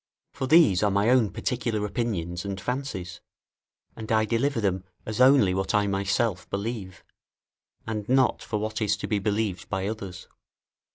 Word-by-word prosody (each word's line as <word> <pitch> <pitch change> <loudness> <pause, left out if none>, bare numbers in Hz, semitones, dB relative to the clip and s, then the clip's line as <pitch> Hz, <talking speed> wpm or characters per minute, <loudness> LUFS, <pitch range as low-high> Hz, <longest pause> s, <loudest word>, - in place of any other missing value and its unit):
For 130 - -3
these 140 - +5
are 105 - +3
my 100 +3 +2
own 125 -5 +4
particular 115 -3 -2
opinions 95 -5 -3
and 100 -1 -4
fancies, 100 -7 -4 0.7
and 110 -1 -7
I 110 -1 +3
deliver 120 +4 0
them 95 -3 0 0.2
as 110 +3 -2
only 130 -8 +6
what 95 +2 -1
I 105 -1 +3
myself 100 0 -1
believe, 100 -2 -5 0.8
and 110 -1 -4
not 130 -1 +3
for 105 - -3
what 110 +1 -3
is 105 -1 +1
to - - -5
be 105 - 0
believed 105 -2 -2
by 95 -1 -2
others. 100 -4 -6
105 Hz, 160 wpm, -26 LUFS, 95-115 Hz, 0.8 s, only